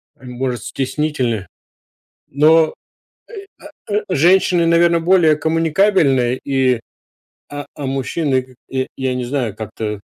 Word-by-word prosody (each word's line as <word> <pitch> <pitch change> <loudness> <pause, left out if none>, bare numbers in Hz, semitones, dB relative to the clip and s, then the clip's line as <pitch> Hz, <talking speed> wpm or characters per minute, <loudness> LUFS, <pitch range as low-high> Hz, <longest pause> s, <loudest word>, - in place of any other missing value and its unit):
Они 130 -4 -11
может 125 -3 -3
стеснительны? 130 - -2 0.8
Но, 155 +3 +4
э, - - -8 1.2
а, 205 - -4
э, 210 - +1
женщины, 180 +1 +3
наверно, 170 0 +3
более 165 -3 +4
коммуникабельные 160 -5 +2
и 130 -3 +1 0.7
А, 145 0 -7
а, 145 - -6
мужчины, 135 +1 -1
к 130 0 -18
я 130 0 -2
я 130 -1 -1
не 125 0 -3
знаю, 120 -5 -2
как-то 105 -1 -5
140 Hz, 125 wpm, -18 LUFS, 125-165 Hz, 1.2 s, Но